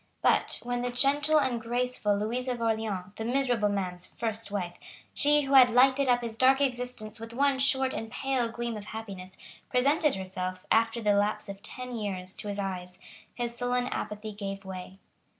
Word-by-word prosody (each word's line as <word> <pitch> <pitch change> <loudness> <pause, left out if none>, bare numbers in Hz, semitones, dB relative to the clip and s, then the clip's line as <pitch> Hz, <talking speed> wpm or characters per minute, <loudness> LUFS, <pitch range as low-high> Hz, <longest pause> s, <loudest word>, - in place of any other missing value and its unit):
But, - - +3
when 245 0 -2
the 245 - -1
gentle 285 +5 +3
and 255 -5 0
graceful 240 -3 0
Louisa 245 +5 -1
of 240 - -7
Orleans, 220 -4 -1
the 220 - -3
miserable 245 -3 +1
man's 180 -3 -3
first 225 -2 -3
wife, 185 -4 -3 0.4
she 295 +1 +4
who 275 0 -2
had 255 -2 +9
lighted 260 +3 +4
up 245 0 +4
his 230 -2 -4
dark 260 +3 +5
existence 245 -5 -2
with 225 +1 -8
one 275 +1 +2
short 265 -1 +3
and 225 - -4
pale 260 -3 0
gleam 235 0 -4
of 210 -1 -7
happiness, 195 -4 -8 0.4
presented 280 +3 +3
herself, 185 -1 -4
after 230 +1 +3
the 210 -2 +3
lapse 205 +1 0
of 200 0 -7
ten 250 +3 -6
years, 190 -4 -4
to - - -5
his 205 0 -3
eyes, 180 -2 -4 0.4
his 240 -1 -3
sullen 245 0 0
apathy 210 +1 -4
gave 195 -1 -6
way. 185 0 -8
230 Hz, 180 wpm, -29 LUFS, 205-250 Hz, 0.4 s, had